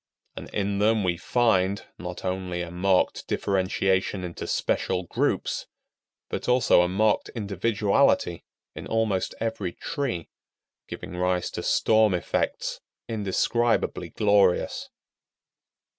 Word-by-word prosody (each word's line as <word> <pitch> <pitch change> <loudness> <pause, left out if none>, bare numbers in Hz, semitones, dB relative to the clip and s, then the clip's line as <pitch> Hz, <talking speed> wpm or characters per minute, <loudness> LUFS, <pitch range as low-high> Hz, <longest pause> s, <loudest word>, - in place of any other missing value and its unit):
And - - -8
in 100 -1 -1
them 110 0 +3
we 90 -2 +1
find, 100 0 +1
not 90 +1 -6
only 90 -1 -2
a 85 - -7
marked 95 +1 +1
differentiation 95 0 0
into 85 -1 -6
special 90 - 0
groups, 85 - -1 0.6
but - - -4
also 125 -7 +5
a 90 - +2
marked 105 +4 +1
individuality 105 0 +1 0.3
in - - -8
almost 110 -4 0
every 110 -6 -2
tree, 135 - -3 0.6
giving 90 - -7
rise 90 0 0
to - - -4
storm 110 -3 +3
effects 90 - -2 0.3
indescribably 115 +2 0
glorious. 105 - +2
100 Hz, 110 wpm, -26 LUFS, 90-110 Hz, 0.6 s, also